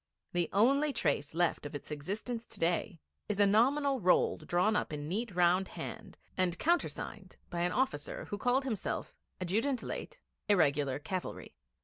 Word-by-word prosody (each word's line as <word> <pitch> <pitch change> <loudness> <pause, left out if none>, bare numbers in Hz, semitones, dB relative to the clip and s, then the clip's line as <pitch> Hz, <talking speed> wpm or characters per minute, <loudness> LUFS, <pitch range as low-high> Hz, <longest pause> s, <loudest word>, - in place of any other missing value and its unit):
The 175 -1 +1
only 275 +9 +4
trace 145 - 0
left 175 0 +1
of 145 0 -6
its 145 - -7
existence 215 +10 -4
to 220 - -10
day 170 +2 0 0.3
is 210 -1 -1
a 205 - +7
nominal 270 +7 +3
roll 185 -3 +3
drawn 180 +5 +2
up - - 0
in 145 -1 -4
neat 205 +3 -2
round 180 +2 +4
hand - - -8 0.2
and 180 -2 +1
countersigned 345 +2 -1
by 170 - -2
an 175 +1 +2
officer 215 - -1
who 205 - -5
called 250 +4 +2
himself 225 -8 -3 0.3
'Adjutant, 225 +9 0
late 485 +1 -6 0.3
Irregular 145 -8 +3
Cavalry.' 180 +5 -5
190 Hz, 155 wpm, -32 LUFS, 170-235 Hz, 0.3 s, a